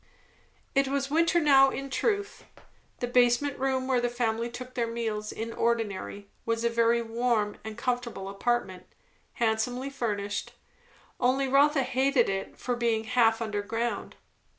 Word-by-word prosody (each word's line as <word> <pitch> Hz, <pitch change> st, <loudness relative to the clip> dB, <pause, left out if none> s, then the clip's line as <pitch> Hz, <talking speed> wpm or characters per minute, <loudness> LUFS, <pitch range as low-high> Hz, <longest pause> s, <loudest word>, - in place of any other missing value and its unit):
It 275 Hz, 0 st, +3 dB
was 275 Hz, 0 st, -1 dB
winter 335 Hz, +2 st, +3 dB
now 270 Hz, -3 st, +6 dB
in 275 Hz, 0 st, -5 dB
truth. 405 Hz, -, -1 dB, 0.6 s
The -, -, +1 dB
basement 245 Hz, +3 st, +2 dB
room 260 Hz, -1 st, 0 dB
where 255 Hz, -2 st, +2 dB
the 240 Hz, -, +1 dB
family 235 Hz, -1 st, -1 dB
took 255 Hz, +1 st, -8 dB
their 235 Hz, -2 st, -1 dB
meals 220 Hz, -2 st, -3 dB
in 230 Hz, +1 st, -5 dB
ordinary, 205 Hz, -3 st, -2 dB, 0.2 s
was 230 Hz, 0 st, -1 dB
a 235 Hz, -, +2 dB
very 235 Hz, 0 st, +2 dB
warm 225 Hz, -2 st, 0 dB
and 220 Hz, 0 st, -7 dB
comfortable 240 Hz, -5 st, -2 dB
apartment; 195 Hz, -2 st, -2 dB, 0.5 s
handsomely 240 Hz, +3 st, -1 dB
furnished; 205 Hz, -6 st, -3 dB, 0.7 s
only 265 Hz, +2 st, +2 dB
Rotha 280 Hz, +2 st, +4 dB
always 260 Hz, 0 st, -4 dB
hated 265 Hz, -1 st, +3 dB
it 195 Hz, 0 st, -4 dB
for 245 Hz, -, -2 dB
being 230 Hz, -2 st, 0 dB
half 225 Hz, 0 st, +3 dB
underground. 220 Hz, +2 st, -3 dB
240 Hz, 145 wpm, -28 LUFS, 225-265 Hz, 0.7 s, now